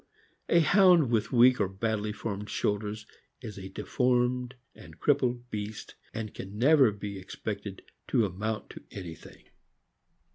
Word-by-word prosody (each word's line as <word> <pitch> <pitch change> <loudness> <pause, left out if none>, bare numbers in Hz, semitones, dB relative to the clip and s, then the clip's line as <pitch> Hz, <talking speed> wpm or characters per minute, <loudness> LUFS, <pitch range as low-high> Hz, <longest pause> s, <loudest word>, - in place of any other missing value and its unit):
A 170 - +5
Hound 175 - +5
with 115 -1 +1
weak 125 0 +6
or 100 - +2
badly 105 +2 -2
formed 105 -1 -5
shoulders 105 +1 -2 0.4
is 110 -5 -8
a 95 0 -8
deformed 125 +4 0 0.2
and - - -14
crippled 125 -4 +1
beast, 105 0 -6 0.2
and 110 -2 -5
can 100 +2 -8
never 135 -1 +5
be 100 -1 -6
expected 100 +1 -6 0.2
to 115 - +2
amount 105 +3 -4
to - - -11
anything. 85 -5 -10
110 Hz, 135 wpm, -29 LUFS, 100-125 Hz, 0.4 s, weak